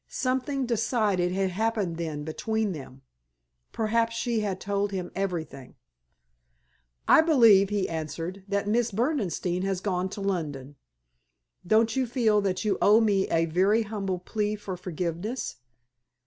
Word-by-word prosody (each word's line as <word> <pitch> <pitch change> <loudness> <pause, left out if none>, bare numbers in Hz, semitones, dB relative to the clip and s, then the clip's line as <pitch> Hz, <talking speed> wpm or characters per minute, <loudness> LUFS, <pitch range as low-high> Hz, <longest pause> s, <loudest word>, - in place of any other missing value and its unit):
Something 260 +1 -1
decided 215 -6 +1
had 190 0 0
happened 210 -4 -1
then 155 -3 -4
between 220 +7 -2
them. 135 -4 -9 0.7
Perhaps 230 +1 0
she 230 -1 0
had 200 -3 -2
told 200 +1 -1
him 185 -2 -4
everything. 170 -8 -4 1.3
"I - - +7
believe," 230 - +6
he 205 -2 0
answered, 165 +4 -5
"that 200 0 -1
Miss 235 +2 +2
Berdenstein 195 - -1
has 190 -1 -1
gone 185 -1 -1
to 205 - -7
London. 145 -8 -3 0.9
Don't 220 +2 +3
you 260 -2 +1
feel 225 -4 +2
that 190 +1 -1
you 210 - +1
owe 210 +2 +6
me 205 -4 +2
a 165 0 +2
very 190 +7 +2
humble 200 -3 -3
plea 210 +3 -2
for 200 -3 -6
forgiveness?" 180 - -4
200 Hz, 135 wpm, -27 LUFS, 180-220 Hz, 1.3 s, I